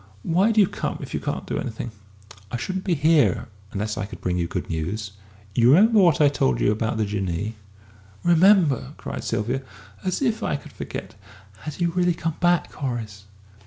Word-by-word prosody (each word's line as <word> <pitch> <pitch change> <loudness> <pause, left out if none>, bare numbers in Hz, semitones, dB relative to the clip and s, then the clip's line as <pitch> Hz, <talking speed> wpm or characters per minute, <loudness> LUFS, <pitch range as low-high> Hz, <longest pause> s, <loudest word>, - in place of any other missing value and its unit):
Why 185 +7 +3
do 220 - +3
you 205 - +7
come - - -3
if - - -8
you - - -1
can't - - -3
do - - -2
anything?" 115 +1 -5 0.6
"I 120 - -3
shouldn't 190 +8 -4
be 180 -4 +2
here 150 - +3 0.2
unless 105 +2 -3
I 100 - -3
could - - -10
bring 90 -1 -1
you 85 -1 0
good 90 - -4
news. 95 +5 -3 0.4
You 120 +3 +4
remember 215 +8 +6
what 175 -5 +5
I 150 - +6
told 65 - +1
you - - +3
about 110 +2 -1
the 110 - +1
Jinnee?" 100 0 -2 0.7
"Remember!" 175 - +4
cried - - -6
Sylvia. 125 +6 -1 0.4
"As 185 - -1
if 230 -3 +1
I - - 0
could 140 - -8
forget! - - -6 0.5
Has 155 -2 -4
he 175 - 0
really 175 0 +1
come 165 -1 -3
back, 175 -1 +2
Horace?" 115 -7 -5
135 Hz, 190 wpm, -24 LUFS, 105-175 Hz, 0.7 s, you